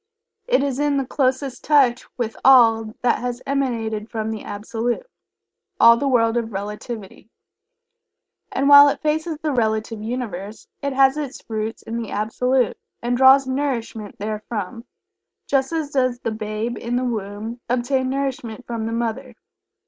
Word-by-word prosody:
It - - +3
is 275 -1 -2
in 290 -1 +1
the 270 - 0
closest 260 0 -1
touch 270 -5 +3
with 230 -3 -2
all 225 -4 +5
that 245 - +2
has 245 0 -3
emanated 230 -6 -2
from 220 -1 -3
the 220 -2 -5
Absolute 230 - -3 0.7
all 235 0 +8
the 280 +4 -1
world 230 -3 +3
of 230 -1 -2
Relativity. 210 +1 -7 1.2
And 275 +1 0
while 285 0 +9
it - - -2
faces 315 +1 -1
the 305 - 0
Relative 220 -3 -1
Universe, 215 -3 -5
it 280 -1 -2
has 270 +1 +4
its 285 -3 -5
roots 220 0 -4
in 230 +1 -4
the 225 - -6
Absolute, 250 +3 0 0.2
and 240 +1 0
draws 265 +2 +6
nourishment 255 -6 -3
therefrom, 215 +2 -5 0.6
just 270 0 +1
as 315 -3 -2
does 255 -3 +1
the 230 - -2
babe 215 +2 -4
in 235 +1 -3
the 255 +1 0
womb 220 0 -4
obtain 255 +2 0
nourishment 260 -4 -3
from 230 -2 -3
the 225 - -3
mother. 235 +2 -3
240 Hz, 150 wpm, -22 LUFS, 220-270 Hz, 1.2 s, while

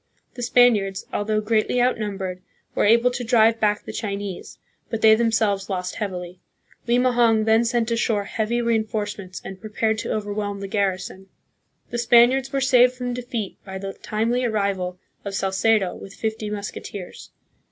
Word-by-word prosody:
The 245 - -8
Spaniards, 220 -6 +3
although 215 +1 0
greatly 220 +3 +1
outnum 220 -5 0
bered, 185 -2 -4 0.3
were - - +1
able 235 +3 +4
to 245 0 -4
drive 225 -1 +4
back 210 -1 +1
the - - -7
Chinese; 200 -3 -5 0.3
but 225 -2 -3
they 220 0 +8
themselves 220 -3 +1
lost 180 -2 -3
heavily. 180 -3 -5 0.5
Limahong 240 -2 +3
then 225 +1 +4
sent 235 -1 0
ashore 230 -3 +1
heavy 225 +4 -1
reinforcements, 215 -4 -2
and 190 -1 -8
prepared 220 0 -1
to - - -4
overwhelm 205 -1 -3
the 195 - -5
garrison. 190 -1 -2 0.6
The 240 - -2
Spaniards 240 +3 +4
were 275 - -1
saved 250 -2 +5
from 250 -1 -3
defeat 240 -4 -5
by 190 -1 -7
the 195 0 -5
timely 230 +6 -1
ar 240 - +1
rival 195 -4 -1 0.3
of 200 -1 -5
Salcedo 195 0 +1
with 195 - -11
fifty 220 -1 -3
musketeers. 205 -2 -7
215 Hz, 155 wpm, -23 LUFS, 200-235 Hz, 0.6 s, they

